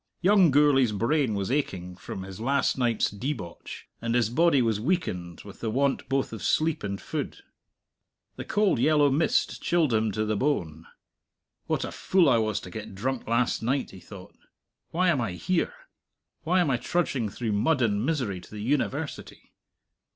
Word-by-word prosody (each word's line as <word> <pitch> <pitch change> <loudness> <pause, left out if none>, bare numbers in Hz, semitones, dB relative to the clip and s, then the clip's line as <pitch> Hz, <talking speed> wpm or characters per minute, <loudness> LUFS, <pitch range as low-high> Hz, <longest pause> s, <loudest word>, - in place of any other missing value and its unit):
Young 190 -1 +5
Gourlay's 135 -5 +4
brain 115 +2 +1
was 100 +2 -2
aching 90 -11 -2
from 95 +1 -7
his 95 0 -9
last 140 +4 +1
night's 120 -4 +1
debauch, 105 - -6
and 115 0 -1
his 115 -2 +2
body 165 +1 +4
was 115 -4 +1
weakened 100 - -2
with 100 -1 -12
the 115 - -2
want 135 +2 0
both 135 -3 0
of 110 - -6
sleep 160 0 +1
and 100 -1 -3
food. - - -5 0.9
The - - -6
cold 210 - +1
yellow 145 +1 +4
mist 150 +5 +1
chilled 165 -7 +2
him 110 -1 +2
to 110 +2 -1
the 110 0 0
bone. 85 - -1 0.8
What - - 0
a - - -6
fool 185 -4 +2
I 115 - +4
was 110 -1 0
to - - -10
get 110 -3 -7
drunk 130 +5 -3
last 115 +1 +1
night, 130 +4 -1
he 95 - -11
thought. 95 +1 -12 0.5
Why 180 +2 +2
am 145 -7 +2
I 110 -6 -2
here? 185 - -1 0.7
Why 180 +4 +2
am 155 -6 +1
I 125 - +2
trudging 130 -4 -1
through 115 +2 -3
mud 130 +7 +2
and 105 -2 +1
misery 125 - -1
to - - -15
the 105 - -8
University? 145 +3 -3
120 Hz, 175 wpm, -27 LUFS, 105-150 Hz, 0.9 s, Young